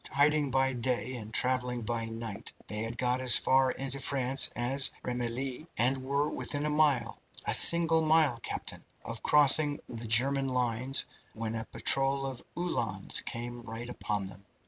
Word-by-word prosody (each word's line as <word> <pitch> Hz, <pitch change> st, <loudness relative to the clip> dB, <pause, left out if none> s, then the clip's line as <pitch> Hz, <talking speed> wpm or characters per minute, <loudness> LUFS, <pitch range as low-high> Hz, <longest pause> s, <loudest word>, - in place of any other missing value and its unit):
Hiding 145 Hz, 0 st, +2 dB
by 135 Hz, 0 st, +1 dB
day 125 Hz, -1 st, -1 dB
and 110 Hz, -2 st, -8 dB
travelling 125 Hz, 0 st, 0 dB
by 115 Hz, +1 st, -3 dB
night, 115 Hz, -2 st, -7 dB
they 105 Hz, 0 st, -4 dB
had 115 Hz, +1 st, -5 dB
got 125 Hz, +1 st, -1 dB
as 125 Hz, -2 st, +7 dB
far 130 Hz, 0 st, +2 dB
into 135 Hz, +1 st, -4 dB
France 135 Hz, 0 st, +2 dB
as 135 Hz, +3 st, +2 dB
Remilly, 125 Hz, +4 st, -4 dB
and 130 Hz, +3 st, +2 dB
were 140 Hz, +2 st, -1 dB
within 145 Hz, 0 st, -3 dB
a 150 Hz, -, -1 dB
mile 145 Hz, -6 st, +1 dB, 0.3 s
a -, -, 0 dB
single 165 Hz, -1 st, +4 dB
mile, 155 Hz, -6 st, +3 dB
captain -, -, -5 dB, 0.2 s
of 115 Hz, -1 st, -6 dB
crossing 145 Hz, 0 st, +5 dB
the 115 Hz, -1 st, -7 dB
German 135 Hz, +5 st, +3 dB
lines 125 Hz, +1 st, 0 dB, 0.3 s
when 110 Hz, 0 st, -4 dB
a 115 Hz, 0 st, -4 dB
patrol 135 Hz, 0 st, +1 dB
of 130 Hz, -2 st, -6 dB
Uhlans 115 Hz, -, -1 dB
came 120 Hz, +1 st, -6 dB
right 115 Hz, +1 st, -8 dB
upon 105 Hz, -4 st, -3 dB
them. 95 Hz, +1 st, -11 dB
125 Hz, 160 wpm, -29 LUFS, 115-140 Hz, 0.3 s, as